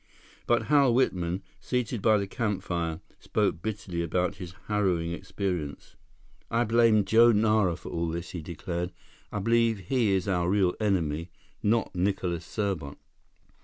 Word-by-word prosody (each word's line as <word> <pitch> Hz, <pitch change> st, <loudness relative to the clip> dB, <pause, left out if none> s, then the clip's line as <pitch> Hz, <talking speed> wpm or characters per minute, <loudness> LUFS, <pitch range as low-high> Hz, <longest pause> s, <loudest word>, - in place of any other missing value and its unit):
But 120 Hz, -, +3 dB
Hal 140 Hz, -5 st, +4 dB
Whitman, 90 Hz, -7 st, 0 dB, 0.2 s
seated 125 Hz, -3 st, -2 dB
by 110 Hz, +1 st, +5 dB
the 100 Hz, -, -1 dB
campfire, 95 Hz, -6 st, -2 dB, 0.2 s
spoke 80 Hz, -, 0 dB
bitterly 100 Hz, -5 st, -3 dB
about 90 Hz, +2 st, -1 dB
his 90 Hz, -2 st, -8 dB
harrowing 95 Hz, -5 st, 0 dB
experience. 90 Hz, -5 st, -4 dB, 0.5 s
"I 115 Hz, +1 st, +2 dB
blame 115 Hz, -2 st, +4 dB
Joe 115 Hz, +1 st, +6 dB
Nara 105 Hz, -4 st, +3 dB
for -, -, -9 dB
all 85 Hz, 0 st, -2 dB
this," 85 Hz, +1 st, -4 dB
he 90 Hz, -, -5 dB
declared. 85 Hz, +2 st, -4 dB, 0.4 s
"I -, -, -3 dB
believe 115 Hz, +2 st, +2 dB
he 125 Hz, -5 st, +2 dB
is 95 Hz, 0 st, 0 dB
our 90 Hz, -3 st, +1 dB
real 95 Hz, -2 st, +3 dB
enemy, 85 Hz, -6 st, 0 dB, 0.3 s
not 110 Hz, +1 st, +1 dB
Nicholas 90 Hz, -2 st, -1 dB
Serbot." 95 Hz, -9 st, -3 dB
95 Hz, 140 wpm, -28 LUFS, 85-110 Hz, 0.5 s, Joe